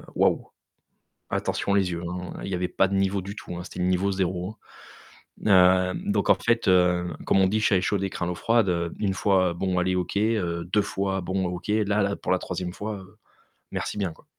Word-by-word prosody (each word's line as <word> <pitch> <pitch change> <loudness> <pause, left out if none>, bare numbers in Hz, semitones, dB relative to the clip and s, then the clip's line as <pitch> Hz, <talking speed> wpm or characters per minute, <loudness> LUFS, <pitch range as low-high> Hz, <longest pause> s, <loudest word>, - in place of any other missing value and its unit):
waouh! - - +2 0.8
Attention 100 - -1
les 95 -2 +2
yeux, 85 0 -4
hein. 90 0 -5
Il - - -4
y - - -1
avait 90 0 -1
pas 95 - +2
de 100 - -2
niveau 95 0 +1
du 100 +2 -7
tout, 90 - -7
hein, 90 - -5
c'était 90 - -8
le 90 - +1
niveau 95 +2 +1
0, 95 0 -1
hein. 110 - -12 0.9
Heu, 90 -1 +5 0.2
donc - - +1
en - - +7
fait, 115 -2 +1
heu, 90 -1 +3
comme 95 - +4
on 95 - +5
dit: 110 +2 +1
«Chat 105 -2 +3
échaudé 95 +1 0
craint 85 - -3
l'eau 90 - -2
froide». 115 0 +2
Heu, 85 -1 -1
1 100 -3 0
fois, 95 -2 +2
bon 90 +1 -1
allez, 90 +1 +1
OK, 90 +2 -3
heu, 95 -6 0
2 105 - +4
fois 95 -1 -2
bon, 95 +1 -1
OK. 90 +2 -5
Là 105 -1 +2
là 100 0 0
pour - - -2
la 95 - +3
3e 90 -1 -4
fois, 105 -1 -5
heu, 95 +3 -15 0.5
merci - - -3
bien, 95 -5 -1
quoi. - - -21
95 Hz, 220 wpm, -25 LUFS, 90-100 Hz, 0.9 s, en